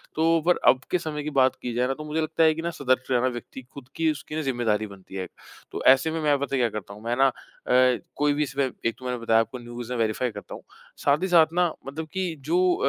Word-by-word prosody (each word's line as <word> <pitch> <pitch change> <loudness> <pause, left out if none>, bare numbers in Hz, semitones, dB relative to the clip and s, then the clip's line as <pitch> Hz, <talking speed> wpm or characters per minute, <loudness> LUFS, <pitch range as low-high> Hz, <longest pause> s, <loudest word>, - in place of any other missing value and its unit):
तो 165 +1 +3
पर 180 - +5
अब 130 +1 +4
के - - +3
समय 150 -2 -4
की 150 - -3
बात 130 0 +3
की 125 - -4
जाए 125 +2 +1
ना 135 - 0
तो 155 +3 -8
मुझे 155 +1 -1
लगता 160 +1 +1
है 160 -1 +5
कि 165 - -4
ना 170 - -2
सतर्क 130 -3 0
रहना 125 0 +3
व्यक्ति 120 +1 -6
खुद 140 -3 -11
की 165 -1 +2
उसकी 155 +1 -5
जिम्मेदारी 115 -5 0
बनती 95 -1 -13
है 95 - -2
एक। - - -10 0.4
तो - - -5
ऐसे 135 +4 +6
में 160 0 -2
मैं 145 -1 +3
पता 140 0 -2
है - - +1
क्या 120 - +2
करता 100 0 -12
हूँ? 105 - -14
मैं 120 +1 -1
ना 135 0 +5
अ, 125 0 +1 0.2
कोई 145 0 +2
भी 150 +1 +1
इसमें 140 -1 -1 0.2
एक 115 - +1
तो 130 - -11
मैंने 125 -1 -2
बताया 115 -1 +3
आपको 115 +3 -5
न्यूज़ 120 0 -8
मैं 120 - -3
वेरिफ़ाई 115 +2 0
करता - - -9
हूँ। - - -12 0.4
साथ 145 +1 +3
ही 190 - +1
साथ 165 -2 +5
ना 175 -1 +2 0.2
मतलब 155 +3 -5
कि 185 -3 -2
जो 180 +1 +3
135 Hz, 270 wpm, -25 LUFS, 120-160 Hz, 0.4 s, ऐसे